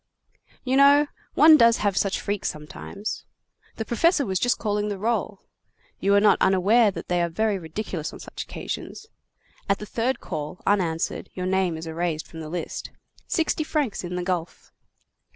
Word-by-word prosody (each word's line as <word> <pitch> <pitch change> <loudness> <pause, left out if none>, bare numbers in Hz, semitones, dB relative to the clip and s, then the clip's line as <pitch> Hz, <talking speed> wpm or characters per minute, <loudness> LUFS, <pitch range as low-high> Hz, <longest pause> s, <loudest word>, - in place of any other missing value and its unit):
You 260 +1 +1
know, 285 +1 +7 0.3
one 310 +1 +8
does 230 -3 +5
have 200 -2 +2
such 195 0 +1
freaks 205 0 -2
sometimes. 155 +7 -6 0.5
The 225 - -4
professor 290 +5 +2
was 190 -3 -1
just 245 - +2
calling 210 -1 -1
the 205 - -3
roll. 210 -1 -1 0.6
You 200 +1 +3
are - - +6
not 210 0 +4
unaware 200 +4 +4
that 195 - -7
they 175 -1 +1
are 170 - 0
very 210 +3 0
ridiculous 165 -1 -5
on - - -11
such - - -8
occasions. 425 - -6 0.6
At 200 - +3
the 210 - -7
third 240 +5 -1
call, 150 +4 -5
unanswered, 170 -5 0
your 185 - -3
name 185 -3 +1
is 160 - -7
erased 160 -1 -2
from 165 - -11
the 155 -1 -7
list. 175 +1 -5 0.4
Sixty 320 -2 0
francs 295 -10 -1
in 180 0 -4
the 180 - -2
gulf." 180 -2 -4
200 Hz, 170 wpm, -25 LUFS, 175-230 Hz, 0.6 s, one